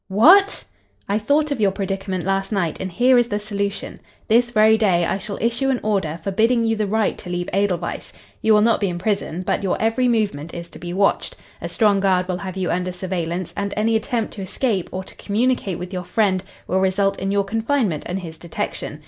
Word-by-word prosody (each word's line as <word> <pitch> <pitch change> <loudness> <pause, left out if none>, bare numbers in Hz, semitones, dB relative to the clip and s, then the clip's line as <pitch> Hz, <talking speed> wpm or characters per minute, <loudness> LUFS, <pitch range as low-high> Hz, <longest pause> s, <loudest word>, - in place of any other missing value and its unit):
"What!" 350 - +5 0.4
"I 205 +2 +1
thought 290 +7 +1
of 275 - -1
your 200 - +4
predicament 195 -2 -3
last 195 +2 -1
night, 185 -6 -1
and 190 - -4
here 245 +6 +4
is 240 - +2
the 205 - -1
solution. 200 -1 -4 0.3
This 240 +2 +4
very 220 -1 +5
day 190 -6 +2
I 190 - -1
shall 200 +1 -6
issue 235 +4 0
an 260 -2 +1
order 190 -7 -1
forbidding 230 +5 +2
you 225 0 +1
the 215 -1 -1
right 220 +1 +1
to 180 - -9
leave 175 0 -2
Edelweiss. 185 -3 -1 0.3
You 220 -1 +4
will 210 - +5
not 230 +1 +3
be 200 - 0
in 175 - -4
prison, 185 -2 -2
but - - 0
your 195 -2 -1
every 225 +3 +2
movement 200 -10 -1
is 170 0 -7
to - - -12
be 175 - -6
watched. 195 +2 +1 0.3
A - - -4
strong 210 -4 +3
guard 185 -2 +2
will 180 -1 -2
have 190 0 -6
you 185 -2 -1
under 180 +1 -1
surveillance, 180 -1 -3
and 200 0 -3
any 225 +1 +2
attempt 225 0 -1
to 200 - -7
escape 195 0 -1
or 185 +1 -4
to - - -13
communicate 215 -3 0
with 180 +2 -7
your 180 -1 -3
friend 190 -1 +1 0.2
will 185 - 0
result 195 +1 +1
in 195 - -2
your 200 0 +2
confinement 220 - 0
and 185 +2 -3
his 160 -2 -9
detection. 170 0 -5
200 Hz, 215 wpm, -21 LUFS, 185-220 Hz, 0.4 s, What